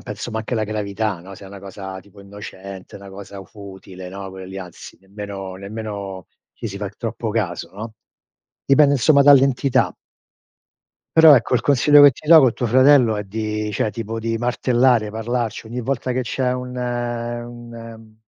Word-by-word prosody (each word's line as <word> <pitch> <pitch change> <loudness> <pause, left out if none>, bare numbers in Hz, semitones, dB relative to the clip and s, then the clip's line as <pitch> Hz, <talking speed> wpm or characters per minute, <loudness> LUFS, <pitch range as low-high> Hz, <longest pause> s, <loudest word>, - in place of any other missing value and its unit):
penso 105 +3 -7
ma 110 - -3
anche 110 +3 -4
la 110 -2 0
gravità, 105 -1 -3
no, 95 +3 -11
se 100 - -13
è - - -10
una 100 0 -11
cosa 95 -1 -8
tipo 100 +1 -18
innocente, 100 -1 -10
'na 100 0 -12
cosa 100 0 -10
futile, 95 -3 -11
no, 95 0 -7
quelle 95 0 -10
lì 95 +1 -8
anzi 90 -3 -11
nemmeno 95 -1 -8
nemmeno 100 -1 -7 0.3
ci - - -7
si 100 - -7
fa 100 0 -4
troppo 115 +1 -5
caso, 95 -6 -3
no, 110 +2 -8 0.7
dipende 140 +1 +5
insomma 140 +2 +4
dall'entità. 135 -1 +4 1.2
Però 160 -2 +9
ecco, 120 - -1
il 125 - +3
consiglio 145 +3 +5
che 145 0 +9
ti 140 - -15
do, 160 0 +9
col 130 -5 +3
tuo - - -4
fratello 130 -1 +5
è 105 - -4
di 105 +1 -3
cioè 105 +1 -1
tipo 115 +2 -5
di 115 0 -2
martellare, 120 -1 +2
parlarci. 115 +1 -3
Ogni 120 +2 -5
volta 130 0 -2
che 130 +1 -1
c'è 125 +2 -1
un 125 0 -6
un 120 -2 -6
110 Hz, 175 wpm, -20 LUFS, 100-125 Hz, 1.2 s, Però